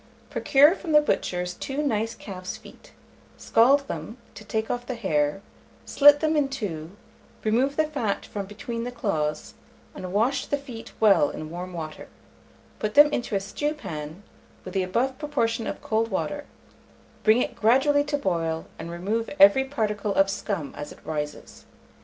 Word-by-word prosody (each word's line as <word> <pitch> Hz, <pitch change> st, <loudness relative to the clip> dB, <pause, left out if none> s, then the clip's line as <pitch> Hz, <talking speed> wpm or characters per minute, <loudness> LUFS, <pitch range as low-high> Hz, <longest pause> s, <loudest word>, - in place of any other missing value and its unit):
Procure 290 Hz, +4 st, +5 dB
from 340 Hz, -5 st, -4 dB
the 300 Hz, -, +9 dB
butcher's 180 Hz, -11 st, -1 dB
2 275 Hz, +9 st, -3 dB
nice 225 Hz, -4 st, -1 dB
calf's 185 Hz, -4 st, -7 dB
feet: -, -, -16 dB, 0.5 s
scald 275 Hz, +5 st, +4 dB
them, 225 Hz, -, -6 dB, 0.2 s
to -, -, -11 dB
take 220 Hz, +1 st, -2 dB
off 245 Hz, 0 st, -4 dB
the 255 Hz, -, -3 dB
hair; 160 Hz, -4 st, 0 dB, 0.4 s
slit 290 Hz, 0 st, +6 dB
them 315 Hz, 0 st, +2 dB
in 290 Hz, -2 st, +2 dB
two, 190 Hz, -, -5 dB, 0.5 s
remove 250 Hz, +6 st, +1 dB
the 315 Hz, -, +3 dB
fat 275 Hz, -10 st, -2 dB
from 200 Hz, -2 st, -5 dB
between 230 Hz, +3 st, -5 dB
the 245 Hz, -, -3 dB
claws, 155 Hz, -10 st, -2 dB, 0.4 s
and 185 Hz, -1 st, -7 dB
wash 245 Hz, +7 st, +1 dB
the 285 Hz, -, 0 dB
feet 255 Hz, -5 st, -10 dB
well 200 Hz, -9 st, +5 dB
in 155 Hz, 0 st, -7 dB
warm 180 Hz, +2 st, -6 dB
water; 160 Hz, -3 st, -7 dB, 0.7 s
put 215 Hz, 0 st, -2 dB
them 295 Hz, +1 st, +8 dB
into 235 Hz, -3 st, -2 dB
a -, -, +2 dB
stewpan, 195 Hz, -, -5 dB, 0.4 s
with 185 Hz, -, -7 dB
the 195 Hz, -, +1 dB
above 240 Hz, +8 st, -1 dB
proportion 230 Hz, -7 st, -1 dB
of -, -, -5 dB
cold 225 Hz, +1 st, 0 dB
water, 290 Hz, +8 st, -3 dB, 0.8 s
bring 220 Hz, +2 st, +5 dB
it -, -, -2 dB
gradually 270 Hz, +6 st, +4 dB
to 290 Hz, 0 st, -1 dB
boil, 165 Hz, -8 st, -1 dB
and 165 Hz, +1 st, -6 dB
remove 200 Hz, +7 st, -2 dB
every 285 Hz, -2 st, +7 dB
particle 210 Hz, -6 st, -2 dB
of 195 Hz, 0 st, +4 dB
scum 185 Hz, -8 st, -4 dB
as 145 Hz, -, -7 dB
it -, -, -12 dB
rises. 150 Hz, -1 st, -6 dB
220 Hz, 165 wpm, -25 LUFS, 185-275 Hz, 0.8 s, the